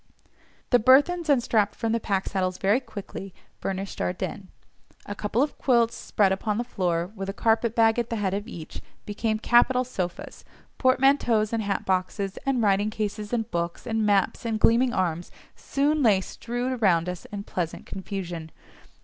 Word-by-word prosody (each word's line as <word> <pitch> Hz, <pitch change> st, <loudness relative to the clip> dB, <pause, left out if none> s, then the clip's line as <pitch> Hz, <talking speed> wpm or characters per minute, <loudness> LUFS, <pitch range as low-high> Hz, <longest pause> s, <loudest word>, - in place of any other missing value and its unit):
The 245 Hz, -, +6 dB
burthens 290 Hz, +8 st, +4 dB
unstrapped 225 Hz, -6 st, +2 dB
from 225 Hz, -, -2 dB
the 230 Hz, -, +1 dB
pack 195 Hz, -3 st, -1 dB
saddles 185 Hz, -1 st, -1 dB
very 200 Hz, +6 st, +2 dB
quickly 195 Hz, -5 st, -8 dB, 0.2 s
furnished 195 Hz, 0 st, -4 dB
our 180 Hz, -, 0 dB
den: 190 Hz, +1 st, -5 dB, 0.6 s
a 205 Hz, -, -5 dB
couple 210 Hz, +5 st, 0 dB
of 290 Hz, -, -4 dB
quilts 235 Hz, -3 st, +3 dB
spread 200 Hz, -2 st, +1 dB
upon 205 Hz, +2 st, -1 dB
the 240 Hz, -, 0 dB
floor, 180 Hz, -6 st, -1 dB
with 195 Hz, -1 st, -5 dB
a -, -, -3 dB
carpet 225 Hz, +2 st, +1 dB
bag 225 Hz, 0 st, +4 dB
at 235 Hz, -, -2 dB
the 230 Hz, -, -2 dB
head 200 Hz, -3 st, -1 dB
of 205 Hz, +2 st, -3 dB
each, 165 Hz, -9 st, -8 dB, 0.2 s
became 215 Hz, +1 st, -1 dB
capital 240 Hz, +3 st, +4 dB
sofas—portmanteaus, 245 Hz, +3 st, 0 dB
and 225 Hz, -, 0 dB
hat 200 Hz, -2 st, -2 dB
boxes, 190 Hz, +1 st, -1 dB
and 255 Hz, -4 st, +1 dB
writing 205 Hz, +1 st, +2 dB
cases, 210 Hz, -1 st, -4 dB
and 235 Hz, -2 st, -2 dB
books, 170 Hz, 0 st, -3 dB
and 225 Hz, -1 st, 0 dB
maps, 200 Hz, -2 st, +1 dB
and 225 Hz, -2 st, -2 dB
gleaming 240 Hz, +3 st, +4 dB
arms 175 Hz, -4 st, -1 dB, 0.3 s
soon 295 Hz, +2 st, 0 dB
lay 215 Hz, -7 st, +5 dB
strewed 245 Hz, +5 st, -4 dB
around 175 Hz, -5 st, +3 dB
us 180 Hz, -1 st, -5 dB
in 200 Hz, -1 st, -6 dB
pleasant 175 Hz, -4 st, -4 dB
confusion. 180 Hz, -4 st, -6 dB
210 Hz, 165 wpm, -26 LUFS, 190-235 Hz, 0.6 s, The